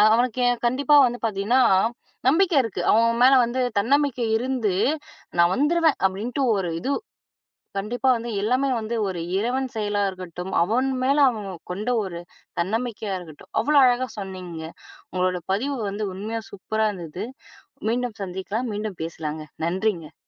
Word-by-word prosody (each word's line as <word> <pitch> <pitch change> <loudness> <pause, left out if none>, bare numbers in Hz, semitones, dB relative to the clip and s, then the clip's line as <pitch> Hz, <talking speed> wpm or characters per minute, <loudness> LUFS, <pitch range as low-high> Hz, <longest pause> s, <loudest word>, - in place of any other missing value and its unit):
அவனுக்குக் 245 0 +1
கண்டிப்பா 280 +4 +3
வந்து 245 0 -4
பாத்தீங்கன்னா, 215 +5 +2 0.7
நம்பிக்கை 335 0 +3
இருக்கு. 225 -4 -4
அவன் 230 +2 +3
மேல 265 - +7
வந்து 255 +2 -2 0.2
தன்னமிக்கை 275 0 +1
இருந்து, 245 -6 -1 0.6
"நான் 170 +2 +5
வந்துருவேன்," 320 +1 +3
அப்படின்னுட்டு 230 +8 0
ஒரு 180 -3 -1
இது 275 - -1 0.9
கண்டிப்பா 245 +6 -1
வந்து, 235 +1 -5
எல்லாமே 255 +5 +2
வந்து 220 +2 -4
ஒரு 175 -3 -4 0.2
இறைவன் 255 +5 0
செயலா 205 -1 0
இருக்கட்டும். 185 0 -7
அவன் 240 +8 +1 0.2
மேல 275 +3 +3
அவன் 210 -4 -6 0.2
கொண்ட 210 +7 -2
ஒரு 170 -3 -5 0.4
தன்னமைக்கையா 220 +1 -2
இருக்கட்டும். 160 -4 -13
அவ்ளோ 295 +6 +2
அழகா 250 +1 +2
சொன்னீங்க. 185 -4 -6 0.5
உங்களோட 180 -1 0
பதிவு 270 +8 -1
வந்து 210 +2 -3
உண்மையா 220 +4 -4
சூப்பரா 220 +2 -1
இருந்தது. 175 +1 -6 0.7
மீண்டும் 240 -1 -1
சந்திக்கலாம். 195 +6 -3
மீண்டும் 210 -3 -4
பேசலாங்க. 155 -1 -5 0.2
நன்றிங்க. 180 -2 -1
220 Hz, 135 wpm, -24 LUFS, 190-250 Hz, 0.9 s, மேல